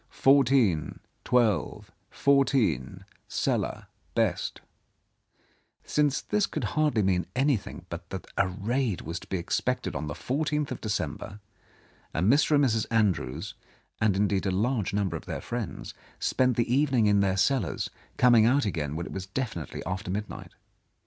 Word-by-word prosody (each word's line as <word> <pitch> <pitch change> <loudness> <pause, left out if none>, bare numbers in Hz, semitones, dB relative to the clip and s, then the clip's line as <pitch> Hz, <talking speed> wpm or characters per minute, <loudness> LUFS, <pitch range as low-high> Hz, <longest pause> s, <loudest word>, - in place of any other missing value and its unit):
Fourteen, 135 - +3 0.2
twelve, 110 -9 +1 0.2
fourteen, 135 - +1 0.2
cellar - - -1 0.3
best," - - 0 1.2
since 145 -2 +1
this 210 -1 0
could - - -4
hardly 150 -8 +2
mean 90 -2 +1
anything 125 - 0
but 85 0 -8
that 95 - -6
a 95 - +2
raid 105 +3 -1
was 85 +2 -5
to - - -14
be 95 - -2
expected 85 - -1
on 75 - -3
the 75 - -4
fourteenth 150 +1 -1
of 130 - -5
Decem 90 -9 -2
ber; 100 +1 -9 0.8
and 95 +10 +4
Mr. 150 +1 +3
and 145 -1 +4
Mrs. 110 -3 +1
Andrews 110 -5 0 0.2
— - - -39
and, 105 -4 +3
indeed, 100 -1 +1
a - - +1
large 110 +2 0
number 100 -4 -1
of 80 - -7
their - - -4
friends - - -5
— - - -28
spent 125 -2 +2
the 120 0 +1
evening 135 -5 +3
in 105 -1 +4
their 95 -1 +1
cellars, 125 +7 0 0.3
coming 120 -3 +6
out 135 +2 +3
again 75 -7 -2
when 85 +2 -3
it - - -8
was 95 0 -5
definitely 100 - -4
after 95 +1 -4
midnight. 105 +3 -5
105 Hz, 155 wpm, -27 LUFS, 95-130 Hz, 1.2 s, coming